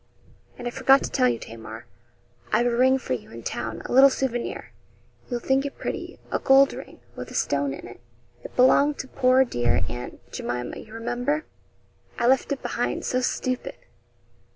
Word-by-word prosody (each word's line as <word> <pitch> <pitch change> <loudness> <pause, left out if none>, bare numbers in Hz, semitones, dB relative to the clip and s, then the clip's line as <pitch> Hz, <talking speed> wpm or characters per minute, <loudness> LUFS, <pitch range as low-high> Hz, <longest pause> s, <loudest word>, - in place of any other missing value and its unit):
'And 245 - -5
I - - -2
forgot 270 +1 +4
to - - -4
tell 125 - +3
you, 120 - 0
Tamar, 110 0 -9 0.7
I've 235 +3 +3
a 240 -1 +1
ring 260 +2 +4
for 255 - -3
you 125 - -5
in 115 0 -10
town 120 - -4
a - - -6
little 270 +2 +8
souvenir; 255 -3 -3 0.6
you'll 245 -2 -2
think 265 +3 +1
it 285 - -6
pretty - - -5
a - - 0
gold 270 0 +5
ring, - - -10 0.2
with - - -7
a - - -9
stone 140 -1 0
in 135 - -7
it 120 - -12 0.4
it - - -10
belonged 280 +3 +5
to 265 - -5
poor 260 0 +4
dear 120 - +1
Aunt 120 +1 -7
Jemima, 125 0 -4
you 215 - -13
remember. 245 +6 -2 0.7
I - - 0
left 265 +3 +3
it 280 - -2
behind; - - -2
so 255 - 0
stupid!' 255 0 -2
245 Hz, 180 wpm, -25 LUFS, -, 0.7 s, little